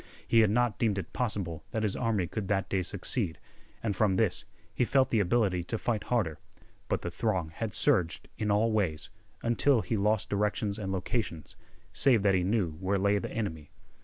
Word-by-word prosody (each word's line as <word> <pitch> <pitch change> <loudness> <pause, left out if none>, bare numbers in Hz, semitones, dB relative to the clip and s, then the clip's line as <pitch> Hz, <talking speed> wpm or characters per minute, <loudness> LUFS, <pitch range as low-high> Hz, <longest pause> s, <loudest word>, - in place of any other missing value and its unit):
He 115 - +5
had 110 -2 +5
not 120 +1 +1
deemed 110 -4 +1
it 95 - -5
possible 95 -10 -2
that 110 - -2
his 105 -3 0
army 110 -6 0
could 100 +3 -4
that 95 -1 0
day 95 - +1
succeed, 90 - -2 0.5
and 105 -3 0
from 100 -1 +2
this 95 -4 +1 0.3
he - - +1
felt 130 +2 +2
the 115 - +3
ability 100 -2 +2
to 115 - -2
fight 110 -1 -1
harder. 100 -11 0 0.5
But - - -1
the 85 - -3
throng 90 -4 -1
had 110 +6 -4
surged 95 - +1
in 105 - -2
all 105 +3 +3
ways, 95 -8 -1 0.3
until 120 +2 +3
he 115 - -2
lost 105 +1 +1
directions 105 0 0
and 95 -2 -3
locations, 95 - -3 0.4
save 120 -7 +4
that 100 -1 +4
he 95 - +3
knew 95 -3 +1
where 95 +1 0
lay 100 +1 +2
the - - -5
enemy. 80 -10 -4
105 Hz, 190 wpm, -30 LUFS, 95-115 Hz, 0.5 s, He